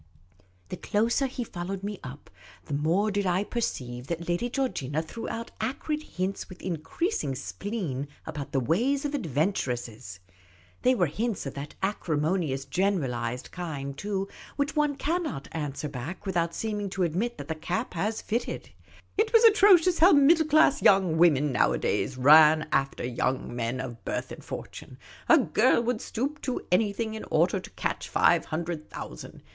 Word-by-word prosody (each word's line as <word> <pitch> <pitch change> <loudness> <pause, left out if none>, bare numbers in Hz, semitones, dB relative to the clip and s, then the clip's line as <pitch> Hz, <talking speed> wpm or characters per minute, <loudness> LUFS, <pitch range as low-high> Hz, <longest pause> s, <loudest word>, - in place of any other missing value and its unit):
The - - -5
closer 235 +6 +1
he 250 -1 -4
followed 190 -1 -5
me 205 -1 -4
up, 135 +3 -10 0.3
the - - -6
more 170 +9 +1
did 200 -1 0
I 180 +2 +2
perceive 125 - -3
that 170 +1 -4
Lady 175 +8 0
Georgina 160 - -1
threw 225 +8 -6
out 230 0 -5
acrid 280 +6 -2
hints 190 -8 -4
with 185 - -11
increasing 165 - -2
spleen 150 - -4 0.2
about 150 -3 -6
the 135 - +1
ways 240 - +1
of 290 - -2
adventuresses. 125 - -2 0.6
They 255 +1 +4
were 180 - +3
hints 210 +6 -2
of 135 - -4
that 140 +1 -7
acrimonious 155 -6 0
generalised 130 -11 -1
kind, 145 -6 -5
too, 195 +2 -2 0.3
which 285 +2 -1
one 295 -1 +2
cannot 305 - -2
answer 150 -2 -4
back 145 +8 -7
without 170 -3 0
seeming 210 -2 -2
to 190 -1 -1
admit 190 +9 -1
that 145 -1 -7
the 160 - -1
cap 175 +9 -3
has 210 +6 -2
fitted. 235 +2 -3 0.5
It 435 +1 +3
was 455 0 +6
atrocious 390 -5 +6
how 350 +4 +7
middle 310 +3 +5
class 305 -1 +4
young 185 -5 +4
women 150 -4 +4
nowadays 130 +1 +1
ran 155 +3 +7
after 135 -2 0
young 125 0 -2
men 120 +1 -2
of 120 -3 -6
birth - - -3
and - - -9
fortune. - - -8 0.3
A - - +8
girl - - +3
would 240 -1 -1
stoop 280 +6 -3
to 255 - -3
anything 215 +3 +1
in 220 - -6
order - - +2
to - - -10
catch - - -3
five - - +3
hundred 160 0 -4
thou - - -7
sand. - - -11
180 Hz, 160 wpm, -27 LUFS, 145-235 Hz, 0.6 s, A